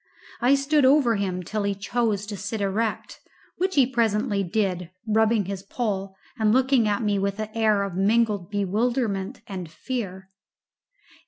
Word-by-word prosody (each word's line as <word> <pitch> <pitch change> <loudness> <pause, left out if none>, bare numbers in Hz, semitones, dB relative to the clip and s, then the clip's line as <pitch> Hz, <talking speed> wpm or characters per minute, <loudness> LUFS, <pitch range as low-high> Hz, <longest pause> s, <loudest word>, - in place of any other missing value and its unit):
I 255 +3 +5
stood 280 +1 +2
over 260 -3 +5
him 185 -2 -2
till 215 +4 -3
he 200 0 -1
chose 210 0 -1
to 205 0 -6
sit 205 +3 -4
erect, 205 +3 -2 0.4
which 375 +1 0
he 275 -3 +6
presently 220 -4 0
did, 180 -3 -1 0.2
rubbing 220 -1 +2
his 195 0 -5
poll 195 -2 -3 0.2
and 215 -1 +3
looking 260 -1 +3
at 205 +2 0
me 205 -2 +1
with 200 0 -1
an 215 0 -3
air 215 -3 +2
of 200 -2 -4
mingled 205 -1 +1
bewilderment 210 +1 -1
and 185 -4 -6
fear. 190 +1 -5
210 Hz, 155 wpm, -25 LUFS, 195-235 Hz, 0.4 s, he